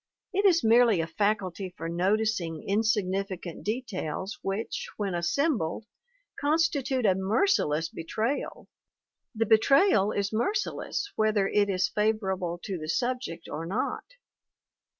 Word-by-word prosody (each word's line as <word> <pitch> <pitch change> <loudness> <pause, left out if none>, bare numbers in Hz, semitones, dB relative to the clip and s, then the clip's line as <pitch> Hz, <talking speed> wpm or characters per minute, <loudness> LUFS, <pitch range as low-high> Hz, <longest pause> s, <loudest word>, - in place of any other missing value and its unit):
It 400 +2 +1
is 350 -4 +5
merely 230 -3 +5
a 165 - 0
faculty 190 0 -1
for 165 - -4
noticing 185 -1 0
insignificant 195 -4 -1
details 205 - -4
which, 195 +4 -3
when 200 -3 -2
assembled, 190 - 0 0.5
constitute 285 -4 +1
a 195 - +5
merciless 190 - +1
betrayal 220 - -3 0.7
the 225 +1 +1
betrayal 225 - +4
is 200 +1 -2
merciless 405 - -1
whether 215 -2 +2
it 205 0 +2
is 190 -1 +1
fa 215 +1 +2
vorable 190 -5 -3
to 190 -4 -4
the 155 0 -6
subject 245 -6 -2
or 165 +1 -5
not. 200 +8 -2
205 Hz, 120 wpm, -28 LUFS, 185-235 Hz, 0.7 s, is